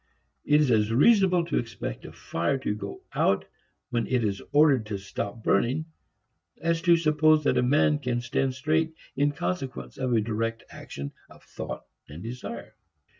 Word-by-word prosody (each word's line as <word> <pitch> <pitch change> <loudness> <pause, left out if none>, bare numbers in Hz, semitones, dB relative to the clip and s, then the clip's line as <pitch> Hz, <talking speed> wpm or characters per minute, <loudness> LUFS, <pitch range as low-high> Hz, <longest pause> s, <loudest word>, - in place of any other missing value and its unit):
It 150 +1 +4
is 140 -4 +2
as 110 -1 +3
reasonable 180 - +4
to 165 - 0
expect 115 -3 -6
a - - -8
fire 85 +10 -2
to 130 -5 -2
go 100 -1 -7
out - - +2 0.5
when 115 -2 0
it 125 -2 +1
is 100 -2 -1
ordered 145 -7 +4
to 105 -2 -3
stop 100 +3 -5
burning 135 +7 +2 0.7
as 165 0 0
to 170 -1 +5
suppose 155 -1 +3
that - - +2
a - - +3
man 145 +3 +3
can 125 -4 -1
stand 130 +2 -1
straight 160 +4 0 0.2
in 145 +2 +2
consequence 140 -3 -4
of 130 -2 0
a 115 - +4
direct 115 +1 -2
action 70 0 -7 0.2
of - - -17
thought - - -7 0.2
and 80 +5 -9
desire. 115 -1 -7
130 Hz, 170 wpm, -27 LUFS, 110-155 Hz, 0.7 s, to